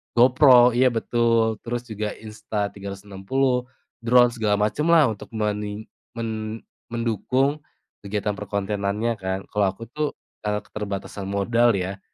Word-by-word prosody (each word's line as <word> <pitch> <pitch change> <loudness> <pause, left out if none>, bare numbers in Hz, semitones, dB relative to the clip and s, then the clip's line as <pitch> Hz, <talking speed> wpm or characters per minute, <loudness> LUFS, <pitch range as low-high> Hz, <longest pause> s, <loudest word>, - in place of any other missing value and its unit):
GoPro, 125 0 +7
iya 130 +1 +5
betul. 115 -1 +1
Terus 120 0 -3
juga 105 0 -3
Insta 105 -1 -4
360, 100 +6 -2 0.3
drone 120 +1 +5
segala 110 -3 0
macemlah 150 +5 +3
untuk 105 - -8
menin 105 0 -2 0.3
men 110 -1 -4 0.3
mendukung 125 +5 0 0.4
kegiatan 105 +1 -2
perkontenannya 105 +2 -2
kan. 95 0 -2
Kalau 105 -1 +2
aku 110 +5 -11
tuh, 150 +1 -2 0.3
eee, 105 0 0
keterbatasan 100 -2 -6
modal 115 +4 +2
ya, 95 +1 -3
110 Hz, 120 wpm, -24 LUFS, 105-120 Hz, 0.4 s, GoPro